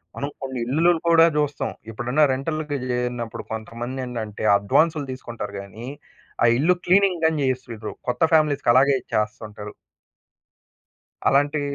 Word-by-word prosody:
మనం 140 +1 -3
కొన్నిల్లులు 135 +6 +1 0.2
కూడా 165 0 +7
చూస్తాం. 145 -1 -1 0.2
ఎప్పుడన్నా 125 +7 +1
రెంటల్‌కి 150 +1 -3
చేరిన్నప్పుడు 120 -2 -3
కొంతమందేంటంటే 115 -1 -5
అడ్వాన్సులు 150 +9 +2
తీసుకుంటారు 115 -5 -7
గాని 110 +4 -10 0.6
ఆ - - +6
ఇల్లు 175 +6 +3
క్లీనింగ్ 185 -2 +3
గాని 160 -2 +2
చేసివ్వరు 120 -4 -4 0.2
కొత్త 125 - -3
ఫ్యామిలీస్‌‌కలాగే 140 -3 +4
ఇచ్చేస్తుంటారు. 105 -1 -4 1.6
అలాంటీ 145 +2 +2
130 Hz, 100 wpm, -23 LUFS, 115-150 Hz, 1.6 s, కూడా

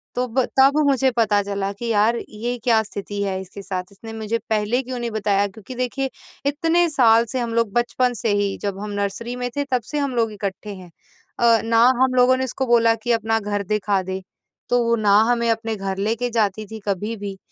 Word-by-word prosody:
तो 250 - 0
ब 255 +2 +1 0.2
तब 275 +2 +6
मुझे 270 -1 +3
पता 210 -3 +3
चला 200 0 -2
कि 240 - -5
यार 225 +1 +3
ये 235 +3 -4
क्या 230 -3 +4
स्थिति 200 0 -6
है 190 -1 -2
इसके 190 +2 -10
साथ, 190 -2 -4
इसने 225 +3 -10
मुझे 220 +1 -2
पहले 220 +4 +1
क्यों 250 -1 -5
नहीं 235 -1 -3
बताया 205 -2 +1
क्योंकि 215 +4 -11
देखिए 255 +2 -2 0.4
इतने 330 +4 +2
साल 235 -6 +4
से 260 - -1
हम 235 -2 -2
लोग 230 -3 +1
बचपन 245 +1 +1
से 230 -1 -2
ही 200 -1 -1
जब 200 -1 -3
हम 210 +1 -5
नर्सरी 215 +5 -3
में 245 0 -3
थे 285 - +1
तब 250 -2 +2
से 300 - -2
हम 280 -3 -1
लोग 225 -2 +1
इकट्ठे 200 0 -5
हैं। 185 -2 -12 0.5
अ, 230 -1 +5
ना 230 0 +3 0.2
हम 260 -1 +3
लोगों 255 +1 +5
ने 260 - -1
इसको 260 +1 -2
बोला 230 -1 +4
कि 240 - 0
अपना 225 -1 +1
घर 205 -1 -2
दिखा 205 -1 0
दे, 190 +1 -4 0.5
तो 245 0 +3
वो 235 0 +2
ना 210 -3 +3 0.2
हमें 235 -1 +1
अपने 225 0 -1
घर 195 -1 -4
लेके 225 +5 -1
जाती 215 -2 0
थी 220 - -6
कभी 205 +4 -2
भी 200 -1 -6
225 Hz, 220 wpm, -22 LUFS, 205-245 Hz, 0.5 s, तब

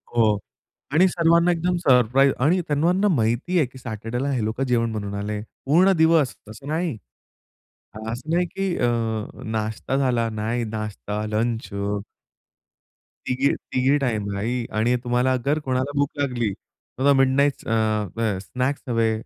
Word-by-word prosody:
हो 110 -3 +4 0.6
आणि 180 +4 +6
सर्वांना 170 0 +3
एकदम 175 +1 0
सरप्राईज 135 -3 +4
आणि 160 +8 +3
त्यांना 175 +7 +2
माहिती 120 +9 0
आहे, 160 - +4
की 130 - -15
सॅटर्डेला 120 +3 -4
हे 125 -5 0
लोकं 110 +5 -2
जेवण 115 -2 +1
बनवून 100 -2 -4
आले 105 +1 -3 0.3
पूर्ण 175 +8 +5
दिवस. 160 -4 +4 0.2
असं 110 +6 -11
नाही 160 -3 -1 1.1
असं 120 +7 -6
नाही, 175 +1 +3
की 190 +1 -2
अ, 120 - +2 0.6
नाश्ता 110 +4 -2
झाला. 120 -4 +1
नाही, 110 +2 -2
नाश्ता, 105 -1 -4
लंच 115 +2 -1 1.6
तिघी 130 +2 +2
तिघी 130 +3 +1
टाईमलाईही 115 -1 -2
आणि 120 +3 +3
तुम्हाला 125 +1 +2
जर 145 +2 +2
कोणाला 130 +1 0
भूक 145 0 +2
लागली, 125 -6 0 0.5
तर 140 +2 +4
मिड 135 0 +4
नाइट्स 140 0 +1
अ, - - -2 0.5
अ, 110 -4 +1
स्नॅक्स 130 +8 -2
हवे, 115 -2 +2
125 Hz, 140 wpm, -23 LUFS, 110-145 Hz, 1.6 s, आणि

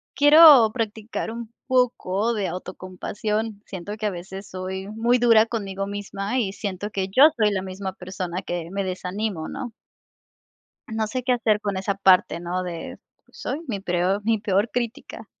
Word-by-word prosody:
quiero 290 -6 +8
practicar 220 -1 -3
un 230 0 -8
poco 235 -4 +1
de 205 -3 -1
autocompasión. 205 +4 -4
Siento 195 +2 -6
que 215 - -4
a - - +1
veces 190 +2 -8
soy 190 +1 -5
muy 235 +3 +1
dura 230 -2 +6
conmigo 195 -4 -4
misma, 205 +3 -3
y 195 -5 -1
siento 200 -1 -4
que 190 -2 -2
yo 270 +10 +7
soy 215 -2 +3
la 190 - -1
misma 190 0 -5
persona 185 -1 -5
que 175 -2 -4
me 200 0 -2
desanimo, 185 -1 -3
¿no? 240 -3 -6 1.2
No 220 0 -1
sé 255 +4 -3
qué 250 0 +2
hacer 225 -3 +2
con 205 -2 -3
esa 195 +1 -1
parte, 190 -3 +4
¿no? 175 +1 -3
De 170 -2 -6 0.3
soy 290 - -5
mi 205 -6 -3
preor 185 +2 0
mi 225 0 +1
peor 200 +2 +1
crítica. 240 -1 -4
205 Hz, 165 wpm, -24 LUFS, 190-225 Hz, 1.2 s, quiero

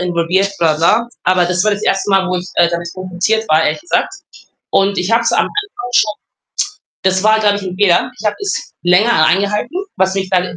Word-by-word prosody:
involviert, 180 +2 0
bla, 160 -2 +2
bla, 165 +2 +3
bla. 235 0 -6 0.2
Aber 185 -1 +3
das 180 +1 0
war 215 - +3
das 205 +1 -4
1. 195 0 0
Mal, 195 -1 +3
wo 185 - -1
ich, 180 +1 -6
äh, 170 - +4
damit 170 0 -4
konfrontiert 185 +4 -1
war, 155 +1 +4
ehrlich - - -1
gesagt 350 +3 -1 0.6
und 195 +1 +1
ich 180 +3 -2
habe 230 +1 +3
es 230 - 0
am - - +3
Anfang 405 -13 -5
schon 215 -3 +2 0.9
das 190 0 +2
war, 215 +1 +4
glaube 205 -1 +2
ich, 205 - -7
'n 185 -1 -5
Fehler. 185 0 +2
Ich 220 - -10
habe 210 - +1
das 405 -1 -4
länger 180 0 +4
eingehalten, 205 - 0 0.2
was 190 +1 +1
mich 190 -1 -2
dann 185 -2 +2
190 Hz, 220 wpm, -15 LUFS, 180-215 Hz, 0.9 s, äh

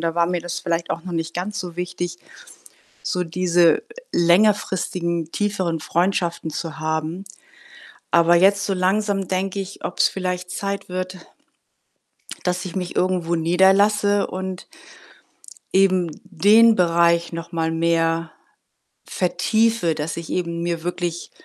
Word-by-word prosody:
da 165 -1 -1
war 170 0 +3
mir 175 0 -1
das 175 +1 -4
vielleicht 170 -1 -2
auch 165 - -3
noch 185 - -6
nicht 165 0 -3
ganz 205 +4 -4
so 175 -2 -7
wichtig, 175 -1 -4 0.9
so 180 0 -1
diese 170 -1 +3 0.3
längerfristigen, 175 -2 +1
tieferen 190 -6 -1
Freundschaften 170 0 -1
zu 160 0 -5
haben. 160 +3 -3 0.9
Aber 170 0 +5
jetzt 195 +3 +4
so 195 - 0
langsam 195 +1 0
denke 190 +2 -2
ich, 195 0 -7
ob's - - +2
vielleicht 180 -1 -4
Zeit 200 +2 -4
wird 185 0 -4 1.3
dass 180 +1 -1
ich 185 - -7
mich 180 -1 -4
irgendwo 180 -2 +1
niederlasse 195 +4 +3
und 185 0 -6 1.1
eben 185 -3 +3
den 205 +5 +5
Bereich 170 -2 +2
noch 165 +1 -7
mal 165 -1 0
mehr 165 0 0 0.7
vertiefe, 220 0 +1
dass 150 0 -4
ich 170 -1 -7
eben 170 -2 -2
mir 170 -1 -2
wirklich 175 -1 -4
175 Hz, 130 wpm, -22 LUFS, 170-190 Hz, 1.3 s, Aber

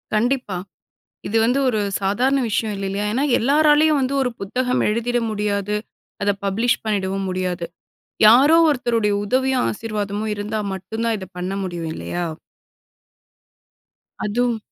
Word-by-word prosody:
கண்டிப்பா. 240 -3 0 0.7
இது 225 - 0
வந்து 250 +4 +2
ஒரு 220 -3 0 0.2
சாதாரண 250 +8 +2
விஷயம் 220 0 -1
இல்லலயா? 195 +1 -2
ஏனா, 255 +6 0 0.2
எல்லாராலயும் 295 +3 +4
வந்து 260 +1 -1
ஒரு 255 - +1
புத்தகம் 250 +6 -1
எழுதிற 235 +3 0
முடியாது. 205 -1 -1 0.5
அத 205 0 +3
பப்ளிஷ் 225 +5 +1
பண்ணிடவும் 195 -2 -1
முடியாது. 185 -1 -2 0.6
யாரோ 265 +9 +7
ஒருத்தருடைய 235 -7 +1
உதவியும், 260 +3 +1
ஆசீர்வாதமும் 210 -1 -3
இருந்தா 210 +1 -3
மட்டுந்தான், 220 +4 -2
இத 190 - -7
பண்ண 180 +2 -3
முடியும். 175 -3 -4
இல்லையா? 175 +1 -4 2.0
அதும். 240 +2 0
215 Hz, 120 wpm, -21 LUFS, 200-250 Hz, 2.0 s, யாரோ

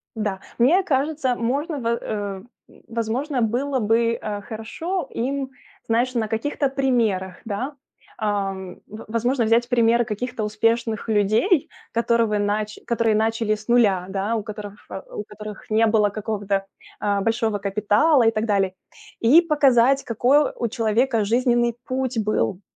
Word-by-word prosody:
да. 210 -3 -2 0.2
Мне 305 +11 +5
кажется, 275 -3 0
можно 280 +7 -2
бы 230 -2 -1
э, 200 -3 -4 0.4
возможно 240 +4 -2
было 255 +5 0
бы, 230 +1 +2
э, 205 -1 -4
хорошо 290 - -4
им, 265 +2 -2 0.4
знаешь, 240 +3 +1
на 230 -3 0
каких-то 275 +5 -1
примерах, 230 -9 0
да. 245 +7 -3 0.5
Эм, 195 -3 -2
в 215 +2 -10
возможно 240 +3 +1
взять 230 +2 +3
примеры 235 0 +3
каких-то 225 +1 -4
успешных 225 +1 0
людей, 220 - +2 0.2
которывы 230 -2 +1
нач 210 +1 -1
которые 230 -2 +2
начали 220 0 +1
с 215 0 -13
нуля, 210 -7 +3
да, 200 +4 -1
у 215 - -3
которых 205 -1 -9 0.3
у 210 - -4
которых 210 0 -10
не 220 +1 +3
было 210 -2 +3
какого-то, 200 -2 -2 0.4
э, 200 -1 +1
большого 225 -1 0
капитала 210 +8 +3
и 225 - +5
так 215 0 -1
далее. 195 -3 +1 0.5
И 265 +9 +6
показать, 275 -5 +3
какой 250 +6 +3
у 235 - -1
человека 230 0 +1
жизненный 240 +1 +2
путь 255 -1 -2
был 210 -2 0
225 Hz, 140 wpm, -23 LUFS, 210-250 Hz, 0.5 s, И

